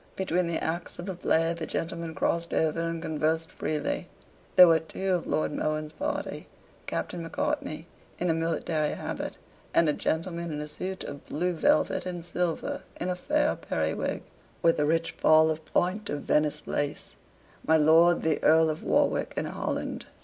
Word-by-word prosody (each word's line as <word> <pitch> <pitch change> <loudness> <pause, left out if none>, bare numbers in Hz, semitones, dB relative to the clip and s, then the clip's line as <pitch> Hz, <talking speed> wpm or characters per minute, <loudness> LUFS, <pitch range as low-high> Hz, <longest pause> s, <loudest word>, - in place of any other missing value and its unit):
Between 180 -2 0
the 170 - 0
acts 170 +2 -3
of 175 - -6
the 190 - -3
play 165 -1 +1
the 165 -2 -5
gentlemen 165 -1 -3
crossed 170 +3 0
over 160 +1 +1
and 165 0 -3
conversed 160 +2 0
freely. 150 -2 -2 0.5
There 180 - +10
were 165 -1 +5
two 190 +4 -2
of 175 - -1
Lord 155 - 0
Mohun's 155 +1 -2
party, 295 +1 -3 0.4
Captain 175 - -3
Macartney, 160 -1 -2 0.3
in 180 - -1
a 165 - +3
military 165 -1 0
habit, - - -5 0.4
and 165 - +5
a 150 - +3
gentleman 170 +2 -2
in 150 - -3
a 150 - -4
suit 185 +5 -4
of 140 - -8
blue 180 +4 -1
velvet 290 - +2
and 175 -2 -5
silver 175 -2 -2 0.2
in 180 - -1
a 180 - 0
fair 295 +10 +1
periwig, - - -2 0.4
with 165 -2 +4
a 145 - +2
rich 165 +1 +1
fall 155 0 +5
of 155 0 -4
point 195 +4 0
of 145 - -2
Venice 150 0 +1
lace 145 0 -2 0.5
my 160 - +4
Lord 165 +3 +5
the 160 -2 +1
Earl 160 0 +5
of 155 - -6
Warwick - - +1
and - - -1
Holland. - - -3
165 Hz, 170 wpm, -28 LUFS, 155-175 Hz, 0.5 s, There